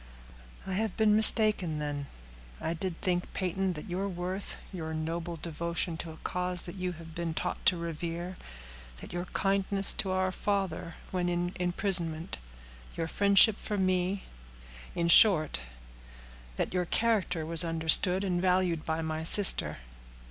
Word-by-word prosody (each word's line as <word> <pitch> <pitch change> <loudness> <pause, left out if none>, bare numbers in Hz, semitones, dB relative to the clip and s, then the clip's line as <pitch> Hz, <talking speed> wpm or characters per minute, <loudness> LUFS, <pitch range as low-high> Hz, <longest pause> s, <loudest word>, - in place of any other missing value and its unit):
"I 190 - -5
have 215 0 -2
been 215 -1 +3
mistaken, 215 -7 +5
then. 145 -1 -4 0.5
I 165 - -3
did 170 0 -5
think, 180 -2 -2
Peyton, 185 0 -2
that 150 +4 -9
your 190 +2 -3
worth, 185 +2 -5 0.2
your 160 -3 -5
noble 165 +2 -4
devotion 170 +1 -4
to 165 - -5
a 160 - -11
cause 180 0 -2
that 175 - -9
you 185 -2 -4
have 165 -1 -12
been 165 -1 -4
taught - - -4
to 180 - +4
revere, 170 +2 -5 0.6
that - - -11
your 175 0 -4
kindness 195 +1 -1
to 190 - +3
our 185 0 0
father 190 -4 -3 0.2
when 180 -1 -1
in 175 0 -2
imprisonment, 175 - -2 0.6
your 165 - -2
friendship 200 +4 +4
for 210 - -3
me,—in 115 - -4
short, 170 - +6 0.9
that - - -3
your 180 -1 0
character 195 -6 0
was 165 +1 +4
understood 165 +3 +4
and 180 -3 -1
valued 180 -3 +1
by 160 0 -3
my 160 0 -4
sister." 195 +4 +5
175 Hz, 145 wpm, -29 LUFS, 165-190 Hz, 0.9 s, short